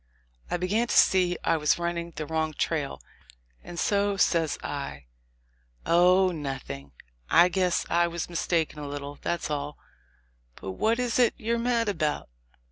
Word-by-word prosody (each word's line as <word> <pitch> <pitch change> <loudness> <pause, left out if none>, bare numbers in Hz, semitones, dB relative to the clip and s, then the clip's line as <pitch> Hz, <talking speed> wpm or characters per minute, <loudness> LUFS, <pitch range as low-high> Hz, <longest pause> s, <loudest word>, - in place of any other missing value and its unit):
I - - 0
began 205 +7 0
to - - +1
see 180 -2 +4
I 165 - +2
was 150 -1 +2
running 170 0 -2
the 155 - -4
wrong 160 0 -2
trail, 70 - -2 0.6
and 175 -1 -7
so 200 +1 +1
says 165 -5 +2
I, 70 -1 -5 0.8
"Oh! 180 +2 +5
nothing: 135 - -6 0.4
I 175 +2 +6
guess 180 -1 +1
I 170 0 +2
was 170 -1 -4
mistaken 165 -2 -1
a 145 - -5
little, 145 0 -6
that's 170 -3 -2
all. 145 0 -3 0.8
But 95 - -6
what 220 - +1
is 250 -1 0
it 240 -2 +4
you're 230 +2 -1
mad 235 -1 +1
about?" 155 - -1
170 Hz, 150 wpm, -27 LUFS, 150-190 Hz, 0.8 s, I